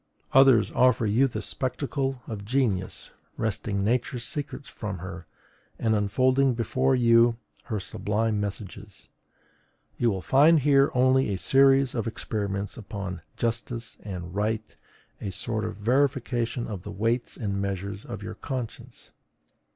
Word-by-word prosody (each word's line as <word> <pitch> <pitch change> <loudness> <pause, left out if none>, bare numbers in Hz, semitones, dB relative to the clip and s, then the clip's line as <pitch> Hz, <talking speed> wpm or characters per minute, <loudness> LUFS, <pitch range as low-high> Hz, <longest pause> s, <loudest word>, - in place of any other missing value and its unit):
Others 135 -4 +6
offer 125 -2 +3
you 115 +6 +3
the 120 - -5
spectacle 135 -1 -2
of 105 -3 -6
genius 105 -5 -1 0.3
wresting 100 -2 -1
Nature's 120 +2 0
secrets 145 -1 -4
from 105 -4 -5
her, 90 -2 -8 0.5
and 110 -1 +1
unfolding 130 +5 +2
before 130 +3 +1
you 115 -1 +5 0.3
her 110 -4 -2
sublime 105 +3 -1
messages; 100 0 -6 0.9
you 120 - +3
will 95 -4 -2
find 150 +4 +5
here 140 0 +4
only 130 0 +4
a 95 - -1
series 135 +4 +4
of 115 -2 -2
experiments 100 -2 -3
upon 100 -5 -6 0.2
JUSTICE 115 0 -3
and 90 -4 -6
RIGHT 110 +2 -2 0.5
a 100 - -3
sort 110 +4 -3
of 110 -1 -4
verification 125 0 0
of 100 -5 -5
the 105 - -9
weights 115 +4 -1
and 100 -3 -2
measures 100 +1 -4
of - - -7
your - - -5
conscience. 130 -5 -7
115 Hz, 135 wpm, -26 LUFS, 100-130 Hz, 0.9 s, Others